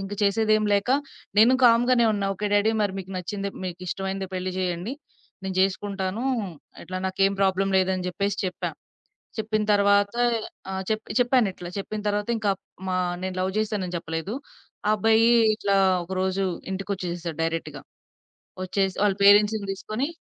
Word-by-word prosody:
ఇంక 195 +1 -6
చేసేదేమి 215 +1 +2
లేక 200 +4 +1 0.5
నేను 235 +4 +7
కామ్‌గానే 240 +1 +5
ఉన్నా. 200 -1 -1
ఓకే. 210 +2 -3
డ్యాడీ 205 +2 +4
మరి 200 -2 0
మీకు 190 0 -7
నచ్చింది 200 +2 -3 0.2
మీకు 180 -1 -5
ఇష్టమైందే 190 +1 -3
పెళ్లి 185 0 -3
జేయండి. 180 +5 -2 0.5
నేను 190 -1 -4
జేసుకుంటానూ 195 +2 -1 0.6
అట్లా 185 - -6
నాకేమి 195 +1 +1
ప్రాబ్లమ్ 195 0 +2
లేదని 185 -1 0
జెప్పేసి 200 +2 -2
చెప్పా. 180 - -3 0.7
చెప్పిన 215 0 0
తర్వాత 200 0 +3 0.6
ఆహ్, 190 0 -3
చెప్ 215 0 0 0.2
చెప్పానిట్లా 235 -8 +1
చెప్పిన 210 +2 -4
తర్వాత 205 +1 -1
ఇంక 215 -2 -1 0.4
మా 185 - 0 0.3
నేను 185 0 -3
లవ్ 190 +1 -1
జేశానని 205 -5 -1
చెప్పలేదు. 165 +4 -4 0.5
ఆ - - +4
అబ్బాయి 220 +2 +4 0.3
ఇట్లా 200 -2 0 0.3
ఒక 175 - -18
రోజు 190 +1 0 0.3
ఇంటికొచ్చేసేసాడు 175 -4 -4
డైరెక్ట్‌గా. 160 -3 -3 0.8
ఒచ్చేసి 190 0 0
వాళ్ళ 200 -2 +3
పేరెంట్స్‌ని 205 0 +5
దీసుకొని 215 +7 -3
195 Hz, 140 wpm, -25 LUFS, 185-210 Hz, 0.8 s, నేను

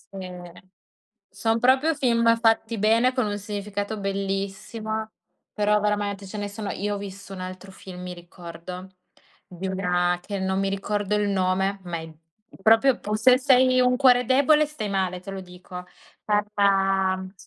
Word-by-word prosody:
Sì. 190 -1 -6 1.0
Son 225 0 0
proprio 265 +6 +3
film 235 -3 +1
ma 230 0 +5
fatti 225 0 +2
bene, 230 +5 +3
con 255 -3 0
un 205 0 -3
significato 205 0 -4
bellissimo, 195 +3 -3 0.4
però 210 0 +2
veramente 205 -1 -1
ce 210 - -7
ne 205 - -3
sono 205 0 -6
io 205 +1 -2
ho - - -3
visto 200 0 -9
un 190 - -8
altro 185 +1 -8
film, 185 -1 -10
mi 180 0 -6
ricordo, 175 +1 -10 0.6
di 180 +1 -8
una 180 -2 0
che 200 +2 -5
non 190 0 -1
mi 195 0 0
ricordo 205 +1 -1
il 205 -1 +1
nome, 190 +1 0
ma 175 -1 -3
è 160 -1 -9 0.5
proprio 225 +5 +5
pu 210 +1 -2
se 250 +4 +5
sei 255 -1 +4
un 250 0 +3
cuore 250 -2 +5
debole 285 +4 +4
stai 220 -9 -5
male, 185 -2 -1
te 195 +2 -9
lo 190 -1 -6
dico 180 0 -10 0.4
guarda 195 -2 +1
200 Hz, 160 wpm, -24 LUFS, 190-225 Hz, 1.0 s, ma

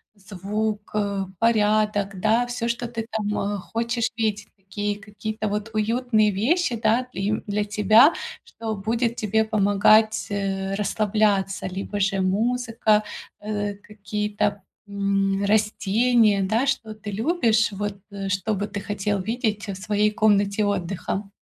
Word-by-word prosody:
звук, 205 +2 -4
э, 200 -2 0 0.2
порядок, 210 -3 +2
да, 230 +5 +2
всё, 240 -1 -3
что 235 0 -2
ты 225 -1 -5
там, 210 -1 -2 0.2
э, - - -3
хочешь 230 +4 -2
видеть, 210 -2 -1
и 195 - -34
такие 205 +1 -3
какие-то 215 +1 -5
вот 210 +1 -3
уютные 215 -1 +2
вещи, 260 - +1
да, 230 +3 +1
и 200 -1 -1
для 210 0 -1
тебя, 215 +8 +5 0.3
что 220 -1 -5
будет 230 +4 -1
тебе 220 -1 +1
помогать, 215 +1 +3
э, 195 -1 -2
расслабляться, 205 -1 0
либо 195 +2 -4
же 195 0 +1
музыка, 225 +2 +1 0.4
э 205 -1 -3
какие-то, 210 0 -3 0.2
м, 200 0 0
растения, 215 +1 +3
да, 220 +7 +1
что 225 -5 -1
ты 210 -1 -7
любишь, 230 - +2
вот, 200 0 -4
э, 195 -1 -5
что 195 +3 0
бы 205 +2 -2
ты 205 - -5
хотел 205 0 -2
видеть 220 0 -2
в 195 - -4
своей 210 +2 +1
комнате 205 -1 +2
отдыха. 195 +1 -3
210 Hz, 135 wpm, -24 LUFS, 200-220 Hz, 0.4 s, тебя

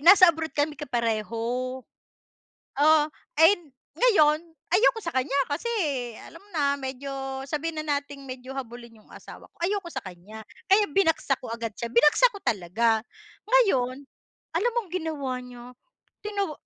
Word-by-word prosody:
Nasa 355 +2 +8
abroad 320 0 -5
kami 295 +1 +1
kapareho. 230 -5 -1 1.4
Oh, 305 +1 +6 0.4
ay 325 +3 +9
hin 310 -5 -21 0.3
ngayon, 310 -12 +5 0.3
ayoko 450 +5 +4
sa 335 - -3
kanya 260 -1 -1 0.2
kasi 290 +10 -3 0.6
alam 330 - -12
mo 400 - -23
na, 285 -2 +1
medyo 265 +1 -6 0.4
sabihin 310 +2 -3
na 290 -2 +1
nating 285 0 -11
medyo 255 0 -7
habulin 240 -3 -8
'yong - - -25
asawa - - -12
ko. - - -42
Ayoko 390 -1 -1
sa - - -4
kanya. 195 +4 -10 0.3
Kaya 410 +2 +6
binagsak 325 -6 +2
ko - - -7
agad 230 -1 -4
siya. 235 - -4
Binagsak 300 - +5
ko 400 - -10
talaga. 220 +3 +1 0.5
Ngayon 280 - +2 0.5
alam 475 +6 +1
mong 440 -7 -1
ginawa 315 -7 -2
niya? 245 -1 -11 0.6
Tina 400 -5 -2
290 Hz, 150 wpm, -26 LUFS, 245-340 Hz, 1.4 s, ay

